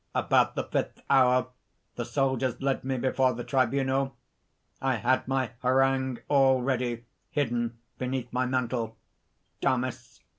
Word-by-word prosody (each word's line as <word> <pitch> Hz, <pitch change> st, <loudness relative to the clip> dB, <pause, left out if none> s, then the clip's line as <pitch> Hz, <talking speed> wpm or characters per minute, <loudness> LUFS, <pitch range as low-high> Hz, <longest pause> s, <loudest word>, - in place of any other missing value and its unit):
"About -, -, +3 dB
the -, -, -1 dB
fifth -, -, -3 dB
hour, 125 Hz, -1 st, +4 dB, 0.5 s
the 120 Hz, -, -3 dB
soldiers 130 Hz, 0 st, 0 dB
led 135 Hz, 0 st, 0 dB
me 130 Hz, 0 st, -1 dB
before 130 Hz, 0 st, +2 dB
the 120 Hz, +1 st, -5 dB
tribunal. 135 Hz, +1 st, +1 dB, 0.7 s
I 135 Hz, -1 st, +1 dB
had 125 Hz, +4 st, +1 dB
my 130 Hz, -3 st, 0 dB
harangue 130 Hz, 0 st, +2 dB
all 135 Hz, -2 st, +4 dB
ready 120 Hz, -2 st, -1 dB, 0.2 s
hidden 120 Hz, -4 st, -1 dB, 0.2 s
beneath 125 Hz, -1 st, -3 dB
my 125 Hz, +1 st, +1 dB
mantle." 120 Hz, -3 st, -1 dB, 0.6 s
DAMIS. 130 Hz, -1 st, -2 dB
130 Hz, 125 wpm, -28 LUFS, 120-135 Hz, 0.7 s, hour